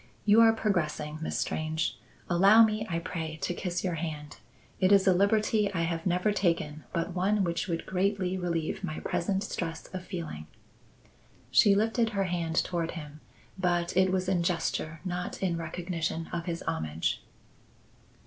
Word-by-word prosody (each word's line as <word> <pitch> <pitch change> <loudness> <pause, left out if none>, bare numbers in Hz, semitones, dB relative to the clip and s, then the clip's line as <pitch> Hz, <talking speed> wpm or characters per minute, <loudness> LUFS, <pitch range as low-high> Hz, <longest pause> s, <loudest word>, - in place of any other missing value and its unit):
"You 215 +2 +7
are 225 0 +8
progressing, 155 -8 -1
Miss 160 - -2
Strange. 160 +1 -1 0.3
Allow 195 +6 +7
me, 215 0 0
I 165 - -1
pray, 160 -2 -4
to 175 - 0
kiss 175 0 -3
your 180 -2 0
hand. 150 -2 -5 0.4
It 185 +1 +3
is 195 -1 +6
a 190 - +6
liberty 210 +2 +2
I 165 - +1
have 165 +1 -2
never 180 +4 +2
taken, 165 -6 -1
but 170 +1 -2
one 195 +3 +2
which 170 -1 -1
would 170 -2 -2
greatly 190 0 0
relieve 170 -3 -2
my 155 - -3
present 190 +3 -1
stress 165 -5 -4
of 185 -1 -4
feeling." 165 - -6 1.0
She 200 -1 +6
lifted 225 +2 +2
her 195 - +3
hand 170 -3 -2
toward 170 -2 -2
him, 150 -1 -9 0.4
but 175 -1 0
it 185 0 +4
was 185 -1 0
in 185 -2 +2
gesture, 165 -2 -1
not 180 0 -3
in 180 -3 +1
recognition 165 -1 -3
of 170 -1 -2
his 170 -1 -3
homage. 80 +1 -2
175 Hz, 160 wpm, -29 LUFS, 165-195 Hz, 1.0 s, are